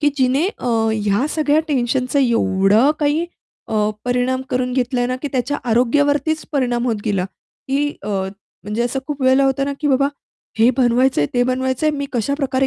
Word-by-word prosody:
की 295 Hz, -, +3 dB
जिने 265 Hz, +6 st, +2 dB
अ, 250 Hz, -, -3 dB, 0.2 s
ह्या 210 Hz, +4 st, 0 dB
सगळ्या 305 Hz, 0 st, +2 dB
टेन्शनचा 255 Hz, 0 st, 0 dB
एवढा 220 Hz, +1 st, +3 dB
काही 300 Hz, +3 st, +1 dB, 0.4 s
अ, 215 Hz, -1 st, +1 dB
परिणाम 250 Hz, +1 st, 0 dB
करून 250 Hz, -1 st, -1 dB
घेतलाय 245 Hz, -1 st, 0 dB
ना, 255 Hz, 0 st, -2 dB
की 290 Hz, -, -2 dB
त्याच्या 270 Hz, +3 st, -1 dB
आरोग्यावरतीच 285 Hz, +6 st, +1 dB
परिणाम 245 Hz, -3 st, 0 dB
होत 230 Hz, -3 st, 0 dB
गेला. 195 Hz, -4 st, 0 dB, 0.4 s
की 285 Hz, +2 st, +1 dB
अ, 205 Hz, -, -6 dB, 0.5 s
म्हणजे 210 Hz, +3 st, -2 dB
असं 245 Hz, +3 st, -1 dB
खूप 295 Hz, -2 st, -4 dB
वेळेला 260 Hz, +1 st, +4 dB
होतं 270 Hz, 0 st, +1 dB
ना, 280 Hz, -, -2 dB
की 295 Hz, -, 0 dB
बाबा, 275 Hz, +1 st, +3 dB, 0.5 s
हे 230 Hz, +3 st, +5 dB
"बनवायचंय 245 Hz, -, +3 dB
ते 245 Hz, -, +3 dB
बनवायचंय 260 Hz, +4 st, 0 dB
मी 280 Hz, -1 st, -3 dB
कशाप्रकारे" 265 Hz, +2 st, 0 dB
260 Hz, 165 wpm, -19 LUFS, 240-280 Hz, 0.5 s, हे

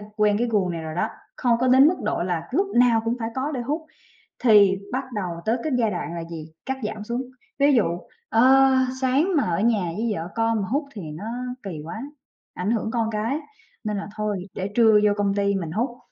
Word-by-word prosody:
quen 210 Hz, -1 st, +3 dB
cái 240 Hz, +1 st, 0 dB
guồng 200 Hz, -5 st, +1 dB
này 165 Hz, -1 st, -4 dB
rồi 160 Hz, 0 st, -6 dB
đó, -, -, 0 dB, 0.3 s
không 235 Hz, -2 st, +2 dB
có 255 Hz, -, +2 dB
đến 260 Hz, +3 st, +7 dB
mức 355 Hz, -, +2 dB
độ -, -, 0 dB
là 170 Hz, -2 st, -2 dB
lúc 385 Hz, +8 st, +1 dB
nào 240 Hz, -2 st, +5 dB
cũng 230 Hz, +1 st, +1 dB
phải 225 Hz, -, -2 dB
có 275 Hz, +4 st, -1 dB
để 255 Hz, -4 st, -3 dB
hút 300 Hz, +6 st, -3 dB, 0.5 s
thì 205 Hz, -5 st, +5 dB
bắt 265 Hz, +2 st, -1 dB
đầu 180 Hz, -5 st, -3 dB
tới 225 Hz, +2 st, +2 dB
cái 310 Hz, -, -2 dB
giai 225 Hz, -3 st, +2 dB
đoạn 175 Hz, -2 st, -4 dB
là 170 Hz, -1 st, -4 dB
gì? 160 Hz, -1 st, -8 dB
Cắt 265 Hz, 0 st, -2 dB
giảm 210 Hz, 0 st, -4 dB
xuống. 235 Hz, +3 st, -2 dB, 0.4 s
Ví 285 Hz, +1 st, +5 dB
dụ, 230 Hz, -, +4 dB, 0.4 s
ơ, 265 Hz, +3 st, +5 dB, 0.3 s
sáng 270 Hz, +7 st, +2 dB
mà 290 Hz, -, +4 dB
ở 170 Hz, 0 st, 0 dB
nhà 220 Hz, -3 st, +2 dB
với 225 Hz, +2 st, -1 dB
vợ 165 Hz, -2 st, -4 dB
con 225 Hz, -1 st, +1 dB
mà 190 Hz, -, -4 dB
hút 285 Hz, +5 st, 0 dB
thì 205 Hz, -, -6 dB
nó 155 Hz, +4 st, -7 dB, 0.4 s
kì 180 Hz, -6 st, -6 dB
quá, 220 Hz, +8 st, -6 dB, 0.5 s
ảnh 185 Hz, +4 st, -2 dB
hưởng 220 Hz, -1 st, 0 dB
con 225 Hz, -1 st, 0 dB
cái 225 Hz, +6 st, -1 dB, 0.5 s
nên 210 Hz, -1 st, -1 dB
là 200 Hz, -, -5 dB
thôi, 210 Hz, -3 st, -2 dB
để 190 Hz, +1 st, -3 dB
trưa 225 Hz, -1 st, +5 dB
vô 210 Hz, -, +4 dB
công 200 Hz, -1 st, +1 dB
ty 200 Hz, 0 st, +1 dB
mình 175 Hz, -5 st, -3 dB
hút, 240 Hz, +5 st, -2 dB
220 Hz, 225 wpm, -24 LUFS, 195-250 Hz, 0.5 s, đến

